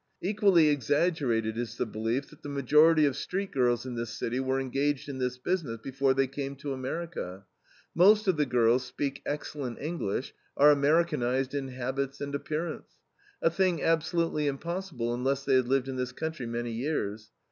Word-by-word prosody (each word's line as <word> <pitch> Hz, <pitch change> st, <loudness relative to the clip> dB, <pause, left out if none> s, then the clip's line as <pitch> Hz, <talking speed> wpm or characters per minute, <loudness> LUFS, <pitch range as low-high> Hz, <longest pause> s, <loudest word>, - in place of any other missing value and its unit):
Equally 195 Hz, -5 st, +4 dB
exaggerated 140 Hz, -5 st, +1 dB
is 120 Hz, -1 st, -4 dB
the -, -, 0 dB
belief 115 Hz, +5 st, -2 dB
that 150 Hz, -, -16 dB
the 145 Hz, -, -7 dB
majority 150 Hz, +3 st, +5 dB
of 140 Hz, -3 st, +1 dB
street 190 Hz, +7 st, -3 dB
girls 125 Hz, -2 st, +1 dB
in 130 Hz, -, -5 dB
this 120 Hz, -1 st, -3 dB
city 120 Hz, +2 st, -3 dB
were 130 Hz, 0 st, 0 dB
engaged 135 Hz, +2 st, -1 dB
in 135 Hz, -2 st, -5 dB
this 125 Hz, 0 st, -1 dB
business 140 Hz, -4 st, -2 dB
before 135 Hz, +2 st, 0 dB
they 135 Hz, 0 st, +3 dB
came 140 Hz, +1 st, -5 dB
to 140 Hz, 0 st, -4 dB
America. 130 Hz, -, -5 dB, 0.5 s
Most 210 Hz, +5 st, +5 dB
of 185 Hz, -, +4 dB
the 150 Hz, -2 st, +1 dB
girls 120 Hz, 0 st, +3 dB
speak 135 Hz, +2 st, -4 dB
excellent 145 Hz, -4 st, -4 dB
English, 145 Hz, -, -3 dB, 0.2 s
are 145 Hz, +1 st, +7 dB
Americanized 140 Hz, -3 st, +2 dB
in 140 Hz, -2 st, -2 dB
habits 130 Hz, +2 st, -3 dB
and 140 Hz, 0 st, -4 dB
appearance, 155 Hz, +3 st, -4 dB, 0.5 s
a 165 Hz, -, +4 dB
thing 180 Hz, -2 st, +1 dB
absolutely 165 Hz, -1 st, +1 dB
impossible 145 Hz, -4 st, -3 dB
unless 135 Hz, +3 st, -1 dB
they 135 Hz, -, +2 dB
had 130 Hz, -2 st, +4 dB
lived 135 Hz, 0 st, +1 dB
in 130 Hz, -1 st, -4 dB
this 125 Hz, 0 st, -3 dB
country 160 Hz, -4 st, -4 dB
many 120 Hz, 0 st, -3 dB
years. 115 Hz, -4 st, -3 dB
135 Hz, 170 wpm, -29 LUFS, 125-155 Hz, 0.5 s, are